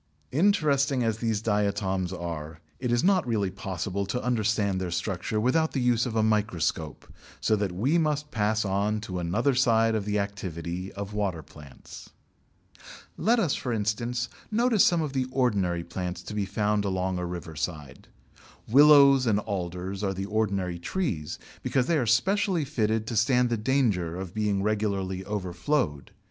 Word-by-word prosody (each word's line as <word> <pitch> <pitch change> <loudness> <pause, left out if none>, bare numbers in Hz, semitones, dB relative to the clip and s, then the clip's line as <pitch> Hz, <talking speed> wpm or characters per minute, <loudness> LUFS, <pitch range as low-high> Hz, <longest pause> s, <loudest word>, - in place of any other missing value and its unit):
Interesting 140 -6 +2
as 110 -1 -1
these 110 -2 -1
diatoms 100 -3 0
are, 80 -3 -6 0.2
it 125 -2 -2
is 120 0 +2
not 190 -7 +3
really 105 -5 0
possible 95 +1 -3
to 125 +5 -2
understand 110 -5 0
their 90 - -2
structure 90 +4 -2
without 160 +8 +1
the 135 - 0
use 125 -1 +2
of 115 - -5
a 110 - +3
microscope, 100 -8 -1 0.3
so 110 - +2
that 100 -3 -1
we 130 - +1
must 150 -2 -1
pass 110 0 0
on 100 +2 0
to 95 -3 -5
another 105 +11 +1
side 115 -3 +3
of 110 -2 -1
the 105 0 0
activity 95 -3 -4
of 100 +1 -6
water 95 -6 -2
plants. 70 -2 -13 1.1
Let 235 +3 +2
us, 180 - +1
for 125 - -3
instance, 115 +3 -1 0.2
notice 230 -1 +3
some 170 -2 +3
of 145 -3 -4
the 130 -2 0
ordinary 100 -10 0
plants 90 +1 -5
to 105 - -7
be 105 -2 -1
found 105 +1 0
along 95 -2 -1
a 90 - -2
riverside. 80 -4 -6 0.6
Willows 140 0 +7
and 105 -2 +3
Alders 95 -1 -4
are 95 -1 -1
the 95 +1 -3
ordinary 100 -4 -1
trees, 85 - -3 0.2
because 130 -2 +1
they 165 +1 +2
are 120 - -1
specially 185 - +2
fitted 110 -6 0
to 115 - -4
stand 125 +2 +3
the - - +2
danger 110 -8 0
of 95 -2 -6
being 105 -2 0
regularly 100 -3 -1
overflowed. 90 - -2
105 Hz, 160 wpm, -27 LUFS, 95-125 Hz, 1.1 s, Willows